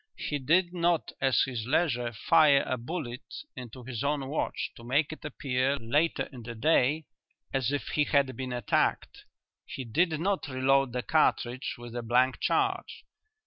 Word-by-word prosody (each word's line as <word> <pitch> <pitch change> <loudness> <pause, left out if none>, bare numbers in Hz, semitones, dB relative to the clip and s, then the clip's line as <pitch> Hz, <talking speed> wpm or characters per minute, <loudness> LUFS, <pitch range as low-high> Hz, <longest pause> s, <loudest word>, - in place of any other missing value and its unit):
He 145 - -3
did 175 +6 +2
not 170 -2 +1
at 135 -1 +2
his 120 -4 -5
leisure 125 -5 +1
fire 145 +5 +4
a 130 - -1
bullet 125 0 -5 0.3
into 125 0 -9
his 125 0 -5
own 140 -2 -1
watch 155 - -2
to 115 - -13
make 140 +6 +1
it 155 - -13
appear, 135 -2 -1
later 145 +8 +1
in 125 - -9
the 120 +1 -7
day, 150 +3 +2 0.5
as 135 -2 0
if 145 - -2
he 150 - +1
had 140 -3 +2
been 130 -1 -5
attacked. 120 -4 -1 0.4
He 135 - -7
did 155 +6 +1
not 195 +1 -1
reload 135 0 +2
the 125 0 -3
cartridge 120 +4 +1
with 120 0 -9
a 120 - -2
blank 125 +3 +2
charge. 390 -2 -1
135 Hz, 165 wpm, -29 LUFS, 125-155 Hz, 0.5 s, fire